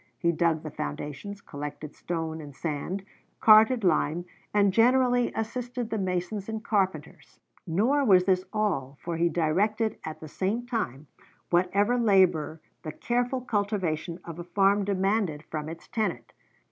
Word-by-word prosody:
He 170 - +2
dug 165 -1 +1
the 155 - -6
foundations, 150 - -6
collected 150 0 -7
stone 160 -2 -4
and 145 -2 -11
sand, 170 +6 -4 0.3
carted 220 +2 +6
lime, 170 -1 +1 0.3
and 200 -2 +3
generally 245 +2 +4
assisted 240 +1 -4
the 220 - -1
masons 185 +2 -2
and 220 0 -4
carpenters. 195 -3 -2 0.3
Nor 230 - +2
was 190 -7 +6
this 185 -1 +2
all, 160 -11 -1
for 170 -1 -4
he 170 +1 +2
directed 205 +8 0
at 155 0 -6
the 155 - -9
same 200 +9 -2
time 155 - -3 0.5
whatever 200 +7 +2
labor 185 -8 +3 0.2
the 155 - -5
careful 245 - -1
cultivation 195 -8 -1
of 170 0 -8
a - - -4
farm 195 +3 +2
demanded 195 -5 0
from 155 0 -4
its 165 0 -9
tenant. 145 - -3
190 Hz, 145 wpm, -27 LUFS, 160-220 Hz, 0.5 s, carted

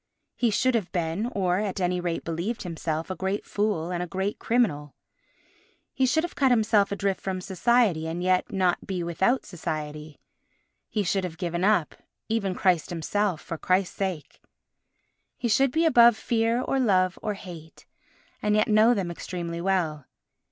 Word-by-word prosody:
He 240 - +1
should 255 +4 +2
have 215 -6 -1
been, 175 +4 -1
or 185 -5 0
at 205 -2 -2
any 180 0 0
rate 175 -1 -2
believed 170 +8 -3
himself, 165 -1 -3
a - - -3
great 190 +2 -2
fool 200 -5 -1
and 175 -1 -2
a 180 - -3
great 190 +4 -3
criminal. 155 - 0 1.0
He 260 - +2
should 315 +6 +2
have 350 - -4
cut 270 -2 +3
himself 215 -4 +3
adrift 200 -1 -1
from 190 -1 -3
society, 195 -3 +1
and 170 +2 -3
yet 185 0 +1
not 185 -3 0
be 185 -3 -2
without 190 +9 +1
society. 155 -4 -6 0.7
He 210 - -1
should 195 +1 0
have 170 -3 -5
given 175 0 -2
up 200 -6 +2
all, - - -34 0.2
even 200 -4 0
Christ 180 -5 +1
himself, 180 +1 -1
for 165 - -6
Christ's 185 0 +1
sake. 185 -6 -4 1.0
He 245 - -2
should 265 +5 +3
be 325 +4 +2
above 235 -7 +6
fear 230 +1 +1
or 270 - 0
love 185 -7 +2
or 210 -2 -2
hate, 170 -5 -11 0.6
and 210 0 +2
yet 215 - +3
know 220 +3 +5
them 185 -4 -2
extremely 170 -1 -5
well. 170 -7 -1
190 Hz, 170 wpm, -26 LUFS, 170-215 Hz, 1.0 s, above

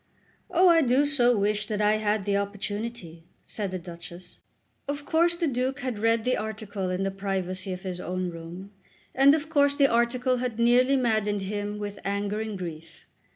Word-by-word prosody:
"Oh, 365 +1 +4
I 335 -2 +6
do 265 +1 +3
so 245 -5 +3
wish 210 +1 0
that 210 -1 -2
I 210 0 +3
had 210 -2 0
the 200 -1 +1
opportunity," 200 -3 -4 0.2
said 205 -3 -4
the 185 - -3
Duchess. 175 +1 -11 0.5
Of 285 0 -4
course 340 +2 +2
the 340 0 -1
Duke 265 0 -1
had 255 -5 -3
read 225 +1 +2
the 255 - +2
article 215 -3 -4
in 185 +1 -1
the 195 - -1
privacy 190 -1 -3
of 185 0 -6
his 185 -2 -4
own 180 +1 -3
room, 170 +4 -9 0.4
and 275 +2 +6
of 315 0 -3
course 285 -3 +3
the 280 - +4
article 250 +1 +2
had 245 -2 -3
nearly 245 +3 +4
maddened 215 -5 +1
him 205 +1 -3
with 205 -1 -6
anger 200 +1 -2
and 220 -2 -4
grief. 165 -3 -8
210 Hz, 185 wpm, -26 LUFS, 195-255 Hz, 0.5 s, I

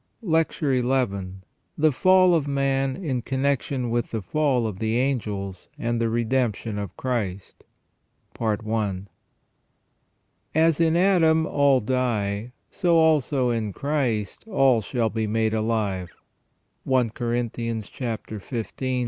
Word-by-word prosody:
LECTURE 160 - +1
XL 125 -5 +1 0.6
THE 155 0 +4
FALL 185 +5 +5
OF 155 -4 +1
MAN 135 -1 0
IN 140 -10 -2
CONNECTION 135 -1 -1
WITH 120 0 0
THE 110 -3 -4
FALL 135 - +1
OF 105 -4 -4
THE 110 +1 0
ANGELS 105 -8 -2
AND 120 0 -1
THE 115 - +1
REDEMPTION 115 -2 -1
OF 100 -4 -6
CHRIST. 105 -7 -3 2.9
"As 160 0 +3
in 165 0 +3
Adam 165 -4 +4
all 140 -3 +3
die, 110 -2 -1 0.2
so 175 -3 +2
also 145 -5 +3
in 110 -3 -2
Christ 125 -8 -1
all 135 - +3
shall 115 +1 -1
be 110 -1 -1
made 110 +1 0
alive." 110 -5 -1 0.4
— - - -13
I 130 -2 +4
Corinthians 115 -2 -2
xv. 110 -4 -5
125 Hz, 115 wpm, -24 LUFS, 110-140 Hz, 2.9 s, FALL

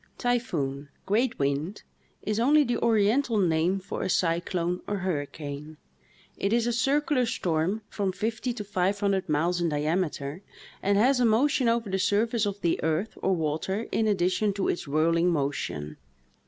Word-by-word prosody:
" - - -39
Typhoon 150 - -1
" - - -40
(great 225 +5 +1
wind) 140 +8 -2 0.4
is 215 +1 -1
only 295 +5 +5
the 245 -3 -1
oriental 225 +2 +2
name 175 0 +2
for 185 - -6
a 190 - -2
cyclone 175 0 0
or 205 - -1
hurricane; 150 -3 -4 0.6
it 200 - -1
is 230 0 +2
a 240 - 0
circular 280 +2 +2
storm 190 -3 -1
from 200 -2 -2
fifty 220 +6 -2
to 235 -3 -5
five 195 0 0
hundred 195 -4 0
miles 170 +4 +1
in 170 - +1
diameter, 150 0 -1 0.4
and 200 +1 +2
has 250 +5 +4
a - - +3
motion 245 +2 +3
over 230 -1 0
the 190 0 -1
surface 210 +3 +1
of 200 0 -4
the 170 - 0
earth 160 +7 -1
or 190 - +2
water 165 +7 -2
in 220 - +1
addition 200 +1 +1
to 195 0 -1
its 170 - -2
whirling 165 +4 +2
motion. 140 - -2
190 Hz, 170 wpm, -27 LUFS, 160-225 Hz, 0.6 s, only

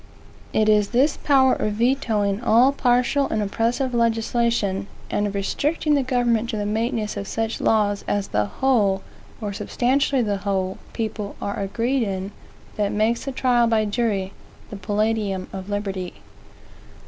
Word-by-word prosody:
It 215 - +2
is 210 -1 +4
this 265 +7 +2
power 265 -2 +4
of 210 - -1
vetoing 220 -4 +1
all 245 +3 +5
partial 255 +1 +2
and 220 - -1
oppressive 235 +5 -1
legislation, 230 -3 +1 0.2
and 205 - +1
of 200 - -5
restricting 295 +10 0
the 285 - +3
government 240 -3 +1
to 220 - -2
the 205 - -2
maintenance 220 0 -1
of 200 -1 -4
such 225 0 -2
laws 205 -2 +2
as 205 -1 -1
the 105 0 +1
whole, 205 - +1 0.4
or 205 -2 -3
substantially 260 +5 +1
the 205 -2 -1
whole, 190 -1 -2
people 215 -3 -4
are 200 - -3
agreed 235 +7 0
in, 195 -2 -3 0.5
that 205 -1 0
makes 220 +3 0
the 275 - -2
trial 245 -2 +2
by 220 -1 +2
jury 205 -3 -1 0.4
"the - - -5
palladium 205 -1 -1
of 190 0 -6
liberty." 195 -3 -3
220 Hz, 150 wpm, -23 LUFS, 200-245 Hz, 0.5 s, all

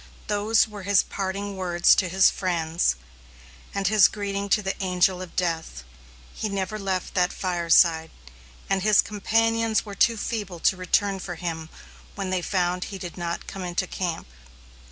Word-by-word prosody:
Those 210 +2 +2
were 210 -2 -9
his 200 +1 +3
parting 200 +1 -4
words 175 -2 +3
to 185 - +1
his 190 +1 +5
friends, 165 - 0 0.8
and 200 -1 -3
his 210 -1 +6
greeting 200 -1 -4
to 210 +1 +2
the 195 - -1
Angel 185 0 +2
of 185 - -9
Death. 165 - -2 0.5
He 215 - -3
never 200 +2 -3
left 190 -2 -3
that 180 -1 +2
fireside, 170 -2 +2 0.6
and 195 -1 +1
his 210 +1 +5
companions 225 +2 +1
were 205 - -8
too 230 +3 +3
feeble 205 -6 -4
to - - +3
return 195 +2 0
for 180 -1 -6
him 165 -2 -5 0.5
when 195 -2 -4
they 185 -1 0
found 180 0 -1
he 195 - -7
did 175 -2 -7
not 170 -1 -4
come 195 - -7
into 180 +1 -2
camp. 175 -2 -4
190 Hz, 160 wpm, -25 LUFS, 175-205 Hz, 0.8 s, his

